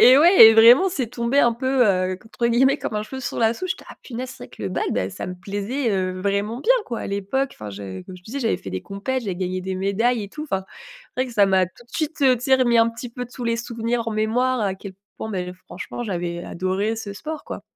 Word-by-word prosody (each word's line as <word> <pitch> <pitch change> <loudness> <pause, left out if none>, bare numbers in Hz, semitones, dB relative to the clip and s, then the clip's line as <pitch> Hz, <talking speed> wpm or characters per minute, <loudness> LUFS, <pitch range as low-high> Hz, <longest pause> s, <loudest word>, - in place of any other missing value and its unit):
Et 255 +1 +9
ouais 330 - +9
et 225 - +7
vraiment, 240 +12 +8
c'est 270 -10 -2
tombé 240 +3 0
un 240 -4 +5
peu, 260 +2 +2
heu, 185 -2 +1
qu'entre 225 +4 -3
guillemets 265 +4 +3
«comme - - -4
un 210 - -1
cheveu 265 +5 -7
sur 245 - -4
la 225 -1 +3
soupe». 370 +10 -5
J'étais: 375 - -4
«Ah - - -11
punaise, 255 0 -6
c'est 190 - -10
vrai - - -13
que - - -11
le 100 - -1
bad, - - -1
bah, 95 +1 -1
ça - - -6
me 180 - -5
plaisait, 205 +7 -2
heu, 185 -2 -1
vraiment 205 +5 -1
bien - - +4
quoi». 235 - -4
À - - -4
l'époque, 200 +8 -1
enfin 105 - -8
je 95 -2 -7
comme 185 - -10
je 180 - -17
disais, 245 +9 -6
j'avais 225 -3 +1
fait 95 - -9
des 95 - -3
compets 215 - -4
j'avais - - -6
gagné 185 0 -2
des 190 +1 -4
médailles 210 +5 +1
et 200 - -7
tout 305 +6 -6
enfin, 190 -10 -2 0.5
c'est 255 - -2
vrai - - -7
que 250 - -9
ça 205 - +6
m'a 190 -1 +3
tout 185 +7 -18
de 240 - -28
suite, 310 -1 -2
heu, 260 -2 +5
tu 245 - -8
sais, 265 -2 +5
remis 245 -3 +3
un 230 0 +5
petit 230 +1 -7
peu 245 +1 -6
tous 245 0 -8
les 230 0 +1
souvenirs 235 0 -2
en - - -3
mémoire. 240 +4 +1
À 195 -2 0
quel 190 0 -10 0.2
point, 220 - -5
bah, 190 -3 -2 0.3
franchement, 180 +7 -6
j'avais 175 -3 -3
adoré 190 +5 -1
ce 210 -2 -6
sport 305 +8 -6
quoi. - - -7
225 Hz, 275 wpm, -23 LUFS, 190-250 Hz, 0.5 s, Et